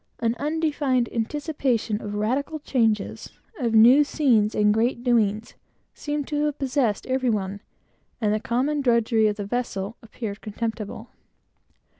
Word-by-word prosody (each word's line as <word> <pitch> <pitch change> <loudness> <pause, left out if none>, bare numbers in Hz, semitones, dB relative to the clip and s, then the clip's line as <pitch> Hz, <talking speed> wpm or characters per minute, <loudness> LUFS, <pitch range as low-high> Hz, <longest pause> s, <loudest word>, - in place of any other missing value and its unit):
An 230 -1 0
undefined 290 -5 0
anticipation 240 -3 -1
of 205 0 -5
radical 260 +9 -1
changes, 225 -8 -1 0.3
of 235 -4 0
new 245 +7 +7
scenes, 240 -8 +2
and 210 0 +4
great 235 +2 0
doings, 220 -3 +1 0.4
seemed 295 -1 -4
to 295 -1 0
have 295 -1 -2
possessed 260 -6 0
every 260 -1 0
one, 200 -2 -2 0.6
and 210 -3 +1
the 215 - 0
common 265 +7 0
drudgery 230 -3 +3
of 210 - 0
the 205 -1 -5
vessel 215 -2 -3
appeared 215 -2 -7
contemptible. 220 0 -5
235 Hz, 135 wpm, -24 LUFS, 215-275 Hz, 0.6 s, new